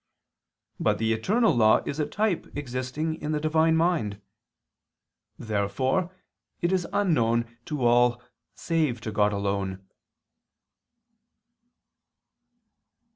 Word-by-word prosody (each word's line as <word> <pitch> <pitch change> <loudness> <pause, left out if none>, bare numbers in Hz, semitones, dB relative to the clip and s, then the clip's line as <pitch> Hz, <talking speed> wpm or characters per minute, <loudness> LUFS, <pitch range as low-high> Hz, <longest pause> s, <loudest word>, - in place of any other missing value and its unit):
But - - +1
the 110 0 +1
eternal 210 - +2
law 110 -2 +4
is 140 - -4
a 150 - 0
type 210 -4 -1
existing 145 +4 -3
in 155 - -2
the 150 - 0
Divine 160 +1 +2
mind. 160 - 0 1.2
Therefore 125 - -1 0.5
it 175 - 0
is 185 -2 0
unknown 115 - +1
to 145 -5 -2
all 120 0 +4 0.4
save 155 -8 0
God 105 0 +3
alone. 100 -1 -3
130 Hz, 95 wpm, -26 LUFS, 110-160 Hz, 1.2 s, law